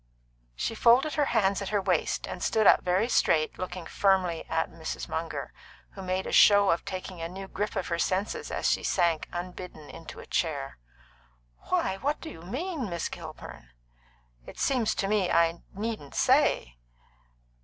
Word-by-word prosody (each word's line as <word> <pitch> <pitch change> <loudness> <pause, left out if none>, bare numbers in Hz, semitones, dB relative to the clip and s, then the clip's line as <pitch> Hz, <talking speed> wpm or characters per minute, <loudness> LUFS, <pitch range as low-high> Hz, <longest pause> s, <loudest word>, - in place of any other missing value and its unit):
She - - -2
folded 245 +6 +4
her 295 - +2
hands 200 -6 +1
at 200 - -3
her 210 - +1
waist, 185 -4 0
and 180 - -6
stood 220 -1 +2
up - - +7
very 185 +5 +1
straight, 155 -9 +2
looking 185 -1 -5
firmly 185 -3 +1
at - - 0
Mrs. - - -5
Munger, - - -4 0.4
who 195 - -9
made 185 0 -2
a - - -4
show 205 -1 +7
of 165 - 0
taking 185 -2 -6
a 165 - -3
new 190 +2 -7
grip 210 +3 -3
of 190 -3 -2
her 170 -1 -1
senses 190 +4 -1
as - - -1
she - - +2
sank 170 -4 +1
unbidden 175 -3 -7
into 165 0 -10
a - - -10
chair. 140 - -2 0.9
"Why, 190 - +1
what 290 +7 -1
do 325 - -8
you 165 - -11
mean, 265 - -4
Miss 170 -1 -3
Kilburn?" 160 - -9 0.8
"It - - -10
seems 240 -5 +1
to 195 - -1
me 205 -2 +2
that - - 0
I 170 0 +3
needn't 210 -8 -4
say." - - +2
185 Hz, 175 wpm, -28 LUFS, 170-210 Hz, 0.9 s, up